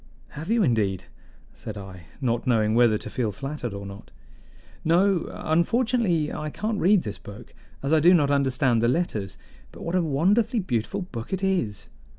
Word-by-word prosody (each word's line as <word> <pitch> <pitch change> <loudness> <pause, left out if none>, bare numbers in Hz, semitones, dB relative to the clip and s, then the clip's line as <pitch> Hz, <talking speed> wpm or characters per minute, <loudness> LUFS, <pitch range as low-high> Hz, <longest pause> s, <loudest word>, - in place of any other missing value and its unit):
"Have 155 +5 -8
you 230 -1 +3
indeed?" 105 - +1 0.5
said 110 -1 -8
I, 95 -3 -10
not 120 -2 -1
knowing 110 -3 +2
whether 115 -2 +4
to - - -8
feel 115 -4 -2
flattered 135 +2 -5
or 100 0 -7
not. 100 0 -10 0.7
"No, 180 +2 +2
unfortunately, 175 -1 +1
I 150 - -4
can't 210 +6 -3
read 195 0 +4
this 105 -1 -6
book, 100 0 -12 0.3
as 140 +3 0
I 160 - +5
do 170 +4 +6
not 150 -6 +4
understand 130 -4 +2
the 115 - +3
letters. 115 - -1 0.3
But - - -11
what 170 - -3
a 185 - +3
wonderfully 200 - +2
beautiful 180 - -2
book 115 -10 -8
it 190 0 -2
is! 175 - -1
145 Hz, 170 wpm, -25 LUFS, 110-180 Hz, 0.7 s, do